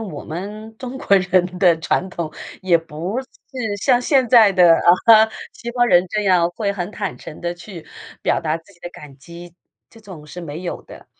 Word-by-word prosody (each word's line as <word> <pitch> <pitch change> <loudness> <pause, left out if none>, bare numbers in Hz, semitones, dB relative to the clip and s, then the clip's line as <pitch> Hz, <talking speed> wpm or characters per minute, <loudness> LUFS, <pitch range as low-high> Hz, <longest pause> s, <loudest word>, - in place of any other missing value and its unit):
我 190 -10 -7
们 210 +6 -8
中 255 +1 -7
国 200 - +3
人 180 0 0
的 175 -4 +4
传 180 +3 -1
统 165 -3 -5 0.3
也 185 -3 +3
不 165 - -5
是 250 -5 -7
像 250 +2 +2
现 260 -3 +2
在 225 -4 +7
的， 175 -3 +6
啊， 220 +6 +5 0.2
西 235 - -7
方 245 0 +1
人 180 -6 +4
这 210 - -1
样 175 -3 +3
会 200 +2 -2
很 195 0 -5
坦 200 -4 -5
诚 155 - -11
地 175 0 -3
去 175 -2 -11 0.4
表 - - +1
达 160 -1 -1
自 165 +5 -22
己 175 - -26
的 175 - -8
感 145 -5 -13
激， 170 +4 -13 0.4
这 225 - -17
种 185 -8 -12
是 175 +4 -9
没 160 +1 -7
有 175 - -5
的， - - -14
185 Hz, 215 characters per minute, -20 LUFS, 170-220 Hz, 0.4 s, 在